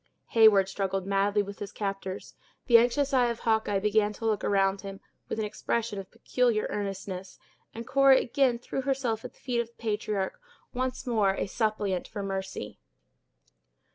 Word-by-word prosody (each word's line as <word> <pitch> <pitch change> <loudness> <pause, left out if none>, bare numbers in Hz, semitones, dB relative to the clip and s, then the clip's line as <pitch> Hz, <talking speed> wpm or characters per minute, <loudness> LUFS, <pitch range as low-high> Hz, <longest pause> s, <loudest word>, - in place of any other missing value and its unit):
Heyward 215 -4 +6
struggled 195 -1 -2
madly 200 +1 +2
with 200 0 -9
his 205 - -6
captors; 195 -2 -5 0.3
the 235 -2 +8
anxious 270 +4 +1
eye 250 -2 +4
of 235 -1 -3
Hawkeye 220 -3 +1
began 210 +1 +2
to 225 - -7
look 215 -2 +1
around 195 -1 +2
him, 195 -1 -8 0.3
with - - -3
an 220 - -1
expression 215 0 -2
of 190 - -8
peculiar 230 -1 0
earnestness; 195 -2 -5 0.4
and 230 +1 -6
Cora 275 +1 +6
again 250 -1 +2
threw 250 +2 -4
herself 255 -5 -1
at - - -8
the - - -26
feet 245 -3 -1
of 235 - -1
the 235 - -27
patriarch, 210 - -2 0.3
once 255 +1 -2
more 210 -6 +2
a - - -1
suppliant 205 -4 -1
for 205 -2 -5
mercy. 190 - -5
210 Hz, 170 wpm, -28 LUFS, 195-235 Hz, 0.4 s, the